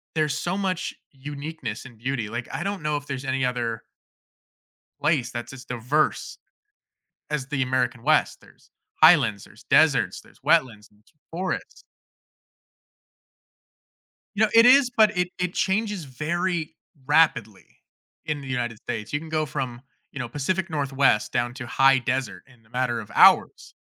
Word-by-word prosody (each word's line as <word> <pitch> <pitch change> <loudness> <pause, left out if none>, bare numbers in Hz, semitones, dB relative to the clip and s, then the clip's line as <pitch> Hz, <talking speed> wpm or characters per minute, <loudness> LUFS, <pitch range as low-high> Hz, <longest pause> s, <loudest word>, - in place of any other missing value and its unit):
there's 155 -2 0
so 175 +4 -2
much 185 -3 -2 0.2
uniqueness 140 -4 -7
and 125 -4 -13
beauty, 120 -2 -3
like, 120 +2 -5
I - - -3
don't 200 -2 -3
know 150 -1 0
if 145 - -7
there's 135 -1 -5
any 130 0 -1
other 120 -2 -2 1.2
place 145 -5 +1
that's 120 0 -6
just 130 -1 -12
diverse 125 +5 -1 0.9
as 140 -3 -3
the 140 -3 -2
American 125 -2 -1
West. 155 +2 +2
There's - - -22 0.3
highlands, 145 - +5
there's - - -18
deserts, - - +3
there's - - -22
wetlands, 110 -5 +1
there's 105 +8 -29 0.2
forests. 185 +3 -4 2.5
You 220 - +4
know, - - 0
it 230 +1 +8
is, 260 0 +6
but 215 -5 +3
it 180 0 +1
it 180 -1 -1
changes 205 -2 -1
very 160 +4 -2 0.3
rapidly 145 -9 +2 0.6
in 150 -2 -3
the 140 - -10
United 120 -4 -3
States. 105 0 -6
You 150 - +1
can 160 - -10
go 155 -1 0
from, 130 -4 -5 0.3
you - - -7
know, 125 -3 -4
Pacific 170 +8 -2
Northwest 140 -6 +1
down 120 0 0
to 125 -2 -7
high 135 +2 +4
desert 125 -6 -3
in 125 -4 -22
a 110 - -27
matter 125 -2 -1
of 105 - -11
hours. - - +4
135 Hz, 155 wpm, -24 LUFS, 120-160 Hz, 2.5 s, it